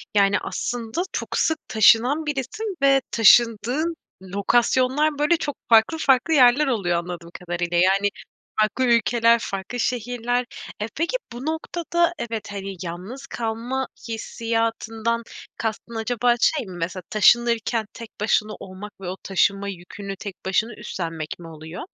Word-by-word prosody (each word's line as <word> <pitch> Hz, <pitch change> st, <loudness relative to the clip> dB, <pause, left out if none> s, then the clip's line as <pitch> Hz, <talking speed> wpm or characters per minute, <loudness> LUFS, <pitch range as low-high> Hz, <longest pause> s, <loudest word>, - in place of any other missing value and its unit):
Yani, 200 Hz, 0 st, +4 dB
aslında 245 Hz, +6 st, -3 dB
çok -, -, -3 dB
sık 320 Hz, -1 st, +2 dB
taşınan 240 Hz, +8 st, +4 dB
birisin 335 Hz, -, -3 dB
ve 275 Hz, -1 st, +5 dB
taşındığın 235 Hz, +8 st, +4 dB, 0.3 s
lokasyonlar, 255 Hz, +9 st, +1 dB
böyle, 320 Hz, +3 st, +3 dB
çok 290 Hz, -3 st, -3 dB
farklı 225 Hz, +8 st, +5 dB
farklı 275 Hz, +2 st, +3 dB
yerler 270 Hz, +2 st, +6 dB
oluyor 185 Hz, -9 st, +1 dB
anladığım 170 Hz, -1 st, -6 dB
kadarıyla. 175 Hz, -1 st, -2 dB
Yani, 195 Hz, +3 st, +4 dB, 0.5 s
farklı 215 Hz, +4 st, +1 dB
ülkeler, 235 Hz, 0 st, +4 dB
farklı 195 Hz, +5 st, -5 dB
şehirler. 245 Hz, 0 st, -1 dB, 0.4 s
E, 215 Hz, -, -1 dB
peki 335 Hz, +10 st, -1 dB, 0.2 s
bu 250 Hz, +4 st, -7 dB
noktada 340 Hz, +2 st, 0 dB
evet, 225 Hz, -4 st, -5 dB
hani, 195 Hz, -1 st, -5 dB
yalnız 185 Hz, +11 st, -7 dB
kalma 235 Hz, +3 st, -3 dB, 0.2 s
hissiyatından 225 Hz, 0 st, -2 dB, 0.3 s
kastın 225 Hz, +1 st, -4 dB
acaba 240 Hz, +1 st, +1 dB
şey 295 Hz, -7 st, +2 dB
mi? 180 Hz, -2 st, -9 dB
Mesela 180 Hz, +2 st, -4 dB
taşınırken 230 Hz, 0 st, +3 dB
tek 230 Hz, -1 st, -9 dB
başına 215 Hz, 0 st, +1 dB
olmak 195 Hz, +2 st, -9 dB
ve 180 Hz, -, -6 dB
o 190 Hz, -, -5 dB
taşınma 200 Hz, +1 st, +1 dB
yükünü 195 Hz, +2 st, -7 dB
tek 195 Hz, -1 st, -7 dB
başına 215 Hz, +5 st, +1 dB
üstlenmek 165 Hz, -6 st, -5 dB
mi 165 Hz, -, -10 dB
oluyor? 160 Hz, +2 st, -8 dB
225 Hz, 135 wpm, -23 LUFS, 195-255 Hz, 0.5 s, yerler